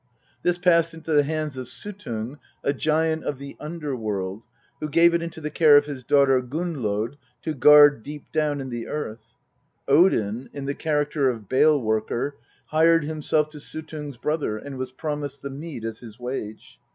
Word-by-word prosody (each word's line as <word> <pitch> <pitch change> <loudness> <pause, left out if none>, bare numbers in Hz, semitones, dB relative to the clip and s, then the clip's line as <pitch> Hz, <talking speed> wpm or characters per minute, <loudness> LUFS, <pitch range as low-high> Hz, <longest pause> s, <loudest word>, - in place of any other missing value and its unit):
This 175 0 +1
passed 170 -2 +3
into 160 0 -7
the 145 - +6
hands 155 -1 -3
of 130 -1 -5
Suttung, 140 - -6 0.2
a 140 - +1
giant 160 +2 +1
of 145 - -3
the 140 +1 -9
underworld, 115 - -4 0.3
who 155 - -3
gave 170 +3 +5
it 170 - +1
into 170 -1 -6
the 150 -1 -5
care 150 -2 +7
of 145 - +4
his 140 -3 -6
daughter 135 0 +4
Gunnlod 125 -5 -2 0.3
to 155 - -2
guard 145 -1 +7
deep 145 +4 -8
down 150 -2 0
in 130 -1 -5
the 120 -1 -4
earth. 115 -7 -6 0.5
Odin, 125 - +3
in 140 -1 -5
the 140 - -1
character 150 -2 0
of 110 -5 -5
Bale 150 +5 +4
worker, 110 +4 -1 0.3
hired 165 +1 +4
himself 155 0 0
to 150 -1 -10
Suttung's 150 -2 -6
brother, 150 -4 -1
and 135 +3 -8
was 130 -1 -4
promised 145 0 -4
the 140 - -4
mead 140 -4 -7
as 115 -1 -5
his 115 -1 -12
wage. 125 -4 -6
145 Hz, 175 wpm, -24 LUFS, 125-155 Hz, 0.5 s, care